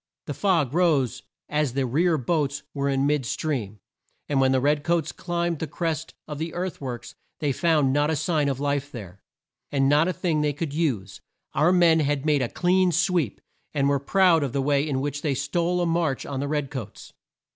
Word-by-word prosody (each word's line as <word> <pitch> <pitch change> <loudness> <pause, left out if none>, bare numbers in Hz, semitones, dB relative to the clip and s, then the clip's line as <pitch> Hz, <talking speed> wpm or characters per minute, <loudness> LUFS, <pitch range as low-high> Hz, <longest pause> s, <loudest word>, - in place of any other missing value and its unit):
The - - -4
fog 170 -10 +1
rose 145 -8 +2 0.3
as 150 -4 0
the 135 0 0
rear 160 +7 +2
boats 145 +1 -1
were 140 -1 -1
in 135 0 +1
mid 145 -1 +1
stream, 115 -6 -3 0.5
and 140 -2 +1
when 130 0 +4
the 130 - +3
red 145 +2 +1
coats 165 -3 0
climbed 170 0 -2
the 160 - -3
crest 165 -1 -3
of 150 -2 -6
the 160 0 -4
earth 180 -2 -4
works 125 -3 -6 0.2
they 145 -2 0
found 150 -2 +2
not 145 +1 +2
a 160 - +1
sign 150 -2 +1
of 135 -1 -2
life 145 0 -1
there, 100 -6 -9 0.5
and 135 -1 +2
not 150 +4 +4
a 185 - 0
thing 165 -5 0
they 150 -1 +1
could 145 0 -4
use. 125 - -2 0.3
Our 155 +5 +3
men 170 -3 +5
had 145 -1 0
made 150 -3 +3
a 120 - -1
clean 180 0 +2
sweep, 175 - 0 0.3
and 140 -1 +2
were 140 0 +2
proud 175 +3 +4
of 135 -4 -2
the 140 - 0
way 145 +1 +1
in 135 -2 -1
which 145 +1 -3
they 145 -4 0
stole 175 +6 0
a - - +1
march 165 -5 0
on 140 -2 -4
the 140 - -2
red 145 -2 -2
coats. 115 -7 -8
145 Hz, 210 wpm, -25 LUFS, 135-165 Hz, 0.5 s, men